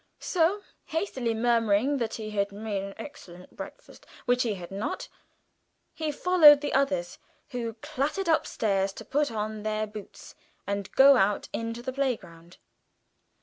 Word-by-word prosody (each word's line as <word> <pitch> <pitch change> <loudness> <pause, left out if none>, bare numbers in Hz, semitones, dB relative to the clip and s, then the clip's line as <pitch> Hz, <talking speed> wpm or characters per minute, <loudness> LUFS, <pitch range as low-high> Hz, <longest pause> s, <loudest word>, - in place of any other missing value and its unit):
So, 370 +4 +1 0.2
hastily 265 - -2
murmuring 230 +3 +2
that 230 -4 -2
he 215 -1 -6
had 200 -1 0
"made 205 -1 -3
an 195 0 -7
excellent 180 -11 -11
breakfast" - - -11 0.2
which 245 0 +2
he 225 -4 0
had 175 -1 -9
not 200 +3 -4 0.9
he 315 -1 -2
followed 300 -2 +7
the 290 - -2
others, 185 -11 0 0.3
who 235 -3 -4
clattered 305 +6 -2
upstairs 200 -11 +1
to - - -10
put 290 +1 +1
on 215 0 -3
their 215 0 -1
boots 210 -1 -11 0.3
and 200 -1 -3
go 275 0 +8
out 205 -1 +1
into 230 +1 -4
the 260 0 -4
playground. 185 -11 -4
230 Hz, 145 wpm, -27 LUFS, 200-280 Hz, 0.9 s, go